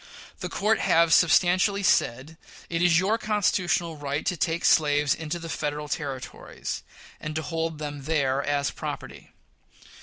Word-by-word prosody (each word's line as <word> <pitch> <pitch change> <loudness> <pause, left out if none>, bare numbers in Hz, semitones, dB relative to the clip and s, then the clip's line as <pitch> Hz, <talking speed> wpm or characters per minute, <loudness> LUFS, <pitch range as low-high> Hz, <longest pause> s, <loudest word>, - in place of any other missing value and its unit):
The - - -4
court 215 +2 +1
have 165 0 +3
substantially 185 +3 +4
said 135 -1 +1 0.4
it 165 0 0
is 175 -2 +5
your 200 +6 +1
constitutional 180 -6 0
right 145 0 -3
to 180 - 0
take 165 +2 -1
slaves 145 -2 +4
into 160 +1 -4
the 165 -1 -8
Federal 150 -1 -3
Territories, 140 -4 -5 0.4
and 155 0 -6
to 155 - -2
hold 165 +1 -3
them 145 -2 -6
there 140 -3 +1
as 145 0 0
property. - - -7
160 Hz, 145 wpm, -26 LUFS, 145-175 Hz, 0.4 s, is